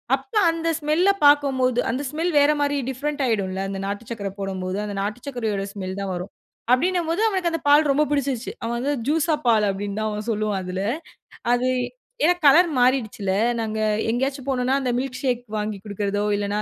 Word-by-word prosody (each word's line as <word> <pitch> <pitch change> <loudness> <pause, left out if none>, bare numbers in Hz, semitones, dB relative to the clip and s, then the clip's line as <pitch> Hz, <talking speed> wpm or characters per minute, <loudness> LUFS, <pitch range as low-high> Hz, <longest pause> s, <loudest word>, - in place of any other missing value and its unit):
அப்ப - - -13 0.2
அந்த 330 0 -3
ஸ்மெல்ல 315 +5 +2 0.2
பாக்கும்போது 265 -4 +4
அந்த 260 +4 -2
ஸ்மெல் 330 +3 -1
வேற 290 +1 +5
மாரி 285 0 +1
டிஃபரண்ட் 285 +3 -3
ஆய்டும்ல. 195 -4 -1
அந்த 195 0 -4
நாட்டு 205 +2 -4
சர்க்கர 205 -4 -3
போடும்போது, 190 -1 -3
அந்த 205 -1 -5
நாட்டு 210 +4 -3
சர்க்கரயோட 220 -7 -2
ஸ்மெல் 190 -1 -5
தான் 195 -1 -3
வரும். 180 +2 -6 0.4
அப்டின்னும்போது 340 +5 +1
அவனுக்கு 375 -5 0
அந்த 330 - -3
பால் 295 +1 +5
ரொம்ப 290 +2 +3
புடிச்சிடுச்சு. 275 -4 -1
அவன் 230 +1 -2
வந்து 275 +4 -1 0.2
"ஜூஸ்ஸா 315 +1 +2
பால்" 220 -2 +4
அப்டின்னு 200 +1 -3
தான் 215 0 -1
அவன் 210 +1 -5
சொல்லுவான் 210 -2 -1
அதுல. 185 +1 -4 0.7
அது 245 +1 +2 0.6
ஏன் 355 +1 +2
கலர் 335 +5 +7
மாறிடுச்சுல. 245 -5 +1 0.3
நாங்க 220 -1 -3 0.3
எங்கையாச்சு 265 +4 -1
போனோனா 255 -1 +1
அந்த 255 -2 -1
மில்க்ஷேக் 255 -1 -1 0.2
வாங்கி 210 -1 -3
குடுக்குறதோ, 205 0 -2
இல்லனா 205 0 -2
250 Hz, 170 wpm, -23 LUFS, 205-290 Hz, 0.7 s, கலர்